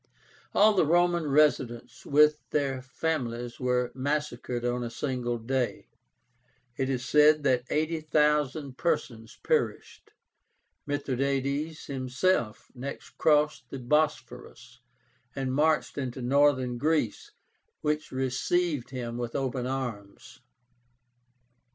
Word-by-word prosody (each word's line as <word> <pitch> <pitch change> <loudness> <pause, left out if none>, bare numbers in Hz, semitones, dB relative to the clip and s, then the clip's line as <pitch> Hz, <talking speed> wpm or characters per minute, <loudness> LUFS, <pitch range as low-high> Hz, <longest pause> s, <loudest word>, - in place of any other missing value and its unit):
All 215 +1 +6
the 190 - +3
Roman 175 0 +2
residents 130 -5 +1
with 150 +1 +5
their 135 -3 -1
families 125 -4 -3
were 125 -1 0
massacred 130 -3 -2
on 120 0 0
a 120 - -3
single 120 0 -2
day. 125 +2 -2 0.9
It 135 0 -1
is 125 -2 -2
said 150 +1 +5
that 130 -3 +2
80,000 150 -3 0
persons 125 -9 -2
perished. - - -1 0.8
Mithradátes 140 +2 -2
himself 130 -2 -1
next 135 +2 -8
crossed 150 -4 +2
the 135 - -6
Bosphorus, 125 -3 -2 0.6
and 135 -2 -2
marched 150 +1 +1
into 130 -1 -4
Northern 130 -2 +2
Greece, 150 -7 0 0.5
which 150 0 -1
received 135 +3 -1
him 120 -2 -5
with 120 -1 -4
open 130 -2 -2
arms. 120 -7 -6
135 Hz, 100 wpm, -28 LUFS, 125-150 Hz, 0.9 s, All